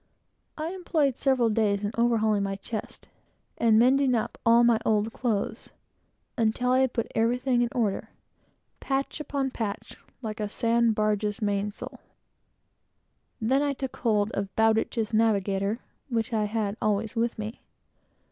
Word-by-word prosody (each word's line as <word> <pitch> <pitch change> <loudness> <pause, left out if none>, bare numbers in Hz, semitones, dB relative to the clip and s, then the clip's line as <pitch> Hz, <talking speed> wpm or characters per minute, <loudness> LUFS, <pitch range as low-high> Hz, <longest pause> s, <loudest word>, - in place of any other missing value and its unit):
I 315 +1 -3
employed 315 -8 0
several 255 -4 +2
days 210 -2 +1
in 205 - -1
overhauling 220 -3 +2
my 195 0 -2
chest, 205 +2 -7 0.5
and 225 -2 +4
mending 255 +2 +4
up 225 - -3
all 230 +1 +6
my 235 -2 +4
old 220 +1 +1
clothes, 225 -5 -2 0.7
until 235 +2 +1
I 255 - +4
had 265 -2 +2
got 230 - -1
everything 245 +2 +1
in 240 - +1
order 220 -5 -1 0.7
patch 275 +2 -2
upon 280 -3 -2
patch, 215 -5 -5 0.3
like 215 -1 -5
a 210 -1 -2
sand 230 0 +2
barge's 210 -1 0
mainsail. 205 0 -3 1.4
Then 260 +5 +2
I 290 -1 +1
took 265 -1 -5
hold 215 -2 +1
of 200 -2 -4
Bowditch's 225 0 +1
Navigator, 205 -1 +1 0.3
which 230 0 -1
I 215 -1 +1
had 210 -1 -2
always 215 +2 0
with 230 +1 0
me. 215 +2 -6
225 Hz, 140 wpm, -27 LUFS, 210-245 Hz, 1.4 s, all